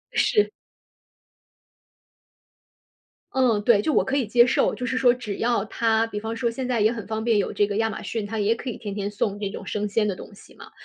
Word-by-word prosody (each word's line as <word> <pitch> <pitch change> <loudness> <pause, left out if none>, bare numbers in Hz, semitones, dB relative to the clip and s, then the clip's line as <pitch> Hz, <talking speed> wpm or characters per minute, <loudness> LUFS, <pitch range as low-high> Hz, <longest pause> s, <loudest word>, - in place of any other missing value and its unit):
是。 420 -3 +3 2.8
嗯， 250 -6 +2
对， 220 -2 +5
就 305 - 0
我 - - +4
可 270 +1 -1
以 265 - +1
接 240 +3 +5
受。 260 - +2
就 250 - -4
是 255 - -1
说 250 -2 +5
只 240 -5 -6
要 235 -3 +1
它 225 +1 +1
比 210 -2 -5
方 225 +2 -4
说 235 +1 0
现 250 +2 -4
在 245 -3 0
也 215 +2 +4
很 225 -3 -6
方 220 0 -3
便， 230 -2 +2
有 200 - -1
这 205 - +2
个 205 0 -3
亚 225 0 +2
马 215 - -6
逊， 225 -3 -3
它 220 +2 -4
也 210 +2 +2
可 255 - -6
以 - - -8
天 205 -4 -6
天 200 -1 -2
送 205 0 -2
这 205 -2 -2
种 195 - -8
生 210 0 -2
鲜 210 +1 +1
的 195 - -1
东 205 - -11
西 200 - -17
嘛， - - -13
225 Hz, 250 characters per minute, -24 LUFS, 205-240 Hz, 2.8 s, 对